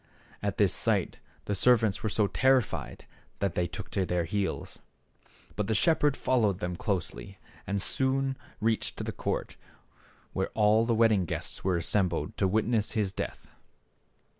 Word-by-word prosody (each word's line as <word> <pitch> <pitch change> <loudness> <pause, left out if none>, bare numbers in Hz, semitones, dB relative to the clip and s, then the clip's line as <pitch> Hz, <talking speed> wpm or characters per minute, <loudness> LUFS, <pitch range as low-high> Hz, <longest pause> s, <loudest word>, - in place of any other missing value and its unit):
At - - -2
this - - +3
sight - - 0 0.3
the 105 - -1
servants 110 0 +3
were 110 - -1
so 105 +1 +2
terrified 130 +2 +1 0.3
that 100 -3 -1
they 90 0 0
took 95 -2 -8
to 95 - 0
their 90 -1 0
heels. 100 +4 -3 0.8
But 105 -2 -2
the 110 - +1
shepherd 150 +1 +3
followed 110 -7 +2
them 90 -3 -3
closely 85 - -3 0.3
and 100 +1 0
soon 135 +5 0 0.2
reached 110 0 0
the - - -2
court - - -3 0.8
where - - -1
all 110 +2 +4
the 115 - +2
wedding 110 -5 +4
guests - - -4
were 90 -2 +1
assembled 90 +2 0
to 95 - +2
witness 110 +2 +1
his 105 -4 0
death. - - -5
105 Hz, 150 wpm, -29 LUFS, 95-115 Hz, 0.8 s, all